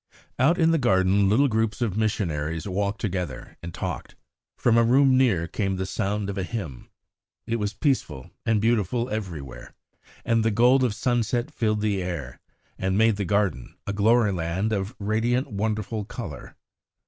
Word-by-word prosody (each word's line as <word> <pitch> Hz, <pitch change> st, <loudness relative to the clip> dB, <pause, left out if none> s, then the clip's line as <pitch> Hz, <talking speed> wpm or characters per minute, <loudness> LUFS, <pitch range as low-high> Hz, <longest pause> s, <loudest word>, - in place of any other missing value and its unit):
Out 150 Hz, +7 st, +4 dB
in 165 Hz, -2 st, +4 dB
the 165 Hz, -, +2 dB
garden 95 Hz, -4 st, +3 dB
little 135 Hz, +8 st, +4 dB
groups 110 Hz, -3 st, 0 dB
of 115 Hz, -6 st, -1 dB
missionaries 85 Hz, -7 st, -1 dB
walked 100 Hz, +2 st, -1 dB
together 90 Hz, -10 st, -4 dB
and 85 Hz, -, -6 dB
talked. -, -, -5 dB, 0.4 s
From 120 Hz, -2 st, +3 dB
a 115 Hz, -, +5 dB
room 130 Hz, +3 st, +5 dB
near 110 Hz, -11 st, +3 dB
came 95 Hz, +2 st, -1 dB
the 95 Hz, 0 st, -2 dB
sound 100 Hz, +1 st, -2 dB
of 100 Hz, 0 st, -3 dB
a -, -, -1 dB
hymn. 90 Hz, -, -6 dB, 0.6 s
It 115 Hz, -, -1 dB
was 105 Hz, -1 st, -3 dB
peaceful 85 Hz, -, -1 dB
and 110 Hz, -2 st, +2 dB
beautiful 115 Hz, +2 st, +1 dB
everywhere, 85 Hz, -, -6 dB, 0.5 s
and 115 Hz, -1 st, +2 dB
the 115 Hz, -, +3 dB
gold 125 Hz, +5 st, +4 dB
of 115 Hz, -5 st, 0 dB
sunset 120 Hz, +1 st, 0 dB
filled 110 Hz, -2 st, 0 dB
the 105 Hz, -3 st, 0 dB
air, 85 Hz, -9 st, -5 dB, 0.4 s
and 95 Hz, +1 st, 0 dB
made 110 Hz, -1 st, +4 dB
the 100 Hz, -, -2 dB
garden 95 Hz, -9 st, 0 dB
a 100 Hz, -, -2 dB
glory 110 Hz, +1 st, +3 dB
land 95 Hz, +5 st, -1 dB
of 100 Hz, +4 st, -2 dB
radiant 115 Hz, +5 st, 0 dB
wonderful 105 Hz, +1 st, -2 dB
colour. 95 Hz, -, -8 dB
105 Hz, 165 wpm, -25 LUFS, 95-115 Hz, 0.6 s, a